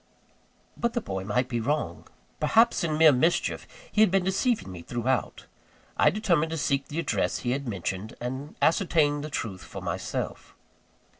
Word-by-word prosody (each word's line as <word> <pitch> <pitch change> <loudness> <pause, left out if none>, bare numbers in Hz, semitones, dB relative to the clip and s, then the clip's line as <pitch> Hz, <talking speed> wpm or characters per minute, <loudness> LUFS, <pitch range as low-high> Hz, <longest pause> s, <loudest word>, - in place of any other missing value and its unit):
But 235 0 -1
the - - +1
boy 95 - -4
might 120 +5 0
be 120 -2 -2
wrong. 145 +6 -2 0.3
Perhaps, 225 -3 +4
in 155 -2 0
mere 160 -1 +8
mischief, 160 +6 +1 0.2
he 215 - +2
had 220 - +6
been 190 0 +2
deceiving 190 - 0
me 90 -2 -8
throughout. 120 +7 -2 0.5
I - - +5
determined 170 -6 +1
to 165 - -3
seek 140 -2 0
the 150 - -6
address 170 - 0
he 120 - -1
had 140 +1 -2
mentioned, 100 0 -4
and 130 +5 -5
ascertain 160 -4 +3
the 155 - -5
truth 100 -9 -4
for - - -8
myself. - - -4
145 Hz, 165 wpm, -27 LUFS, 120-170 Hz, 0.5 s, mere